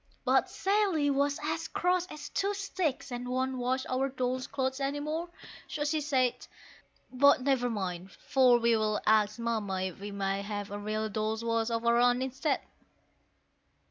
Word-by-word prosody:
But - - +3
Sally 385 -8 +1
was 280 +1 +1
as 320 +2 -2
cross 360 0 0
as 295 -4 -8
two 400 +1 -1
sticks, 370 -9 -2
and 245 0 -4
won't 260 +1 -1
wash 255 +2 0
our 265 +1 0
dolls' 255 -1 -2
clothes 265 0 -2
any 280 +1 -1
more 315 +4 -3 0.4
so 295 - -3
she 300 +1 0
said, 260 -4 0 0.6
But 280 +1 +5
never 260 -3 +2
mind, 190 -4 -4
for 255 -2 +3
we'll 220 -2 +2
ask 215 0 +3
Mamma 215 -5 -1
if 190 -1 -4
we 205 +1 -6
may 195 -1 -2
have 205 0 -5
a 205 - -4
real 215 +1 -2
Dolls' 215 +2 -2
Wash 230 0 +1
of 230 0 -2
our 235 0 +4
own 245 +1 +3
instead. 265 +3 -1
255 Hz, 165 wpm, -30 LUFS, 220-285 Hz, 0.6 s, But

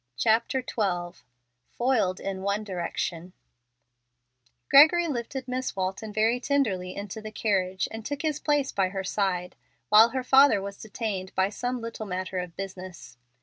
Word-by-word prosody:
CHAPTER 225 - +2
XII 175 -5 -2 0.6
FOILED 225 -7 +1
IN 195 -1 -4
ONE 200 +2 -1
DIRECTION 180 -2 -4 1.3
Gregory 330 +5 +7
lifted 260 -1 -4
Miss 255 +1 -3
Walton 190 +3 -3
very 220 +3 +2
tenderly 220 -10 0
into 205 +2 -6
the 215 - -7
carriage 190 -4 0
and 225 0 -7
took 285 +6 -4
his 305 -2 -1
place 290 -3 +1
by 190 -2 +1
her 195 0 -4
side, 185 -2 -1 0.3
while 220 +2 +8
her 260 +2 -3
father 265 -4 +6
was 200 0 -6
detained 205 -3 -4
by 190 +1 +2
some 245 +4 -3
little 230 -1 -6
matter 185 0 -3
of 180 -2 -6
business. 185 -8 -8
205 Hz, 145 wpm, -27 LUFS, 185-245 Hz, 1.3 s, while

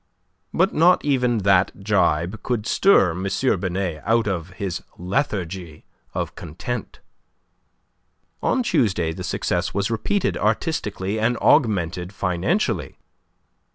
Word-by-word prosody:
But 185 +4 +2
not 175 +2 +4
even 125 -4 +2
that 95 0 +2
gibe 100 -1 +1
could 120 -4 -2
stir 115 - +4
M. 90 +3 -4 0.3
Binet 90 -4 -2
out 115 +1 +2
of 90 -4 -2
his 95 -2 -4 0.2
lethargy 90 - -3 0.3
of - - -2
content. 95 +8 -6 1.4
On 260 - +1
Tuesday 90 - +1
the - - -7
success - - -2
was 100 +2 0
repeated 195 - 0
artistically 105 - -1
and 115 +3 +1
augmented 90 -4 +2
financially. 95 - -1
100 Hz, 110 wpm, -22 LUFS, 90-120 Hz, 1.4 s, not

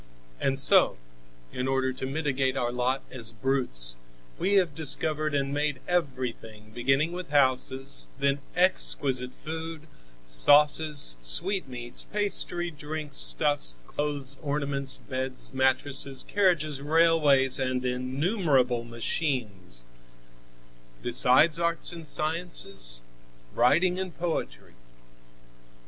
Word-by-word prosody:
And 135 0 0
so, 135 - +5 0.6
in 125 +1 -3
order 130 -1 0
to 130 +1 -6
mitigate 135 -2 -1
our 120 -1 -1
lot 125 +2 -1
as 120 -4 -5
brutes, 105 - +2 0.4
we 200 - 0
have 180 -6 +2
discovered 155 0 0
and 140 0 -1
made 145 -1 -1
everything, 125 -10 -4
beginning 135 +7 +1
with 180 0 -7
houses, 135 -1 0
then 140 0 0 0.2
exquisite 135 -8 +2
food, 160 +1 -7 0.4
sauces, 145 - +3
sweetmeats, 120 - 0
pastry, 195 -4 -1
drink, 150 -1 -7
stuffs, 145 - +3
clothes, 140 - -2
ornaments, 140 -2 -1
beds, 130 -1 -5
mattresses, 135 +1 +1
carriages, 155 -8 0
railways 145 -4 +3
and 130 -1 -2
innumerable 130 - 0
machines, 115 - -3 1.2
besides 130 +6 +4
arts 170 +1 0
and 165 -2 -9
sciences, 155 - -2 0.5
writing 175 +9 +2
and 185 -2 -6
poetry. 160 - -4
140 Hz, 100 wpm, -27 LUFS, 125-155 Hz, 1.2 s, so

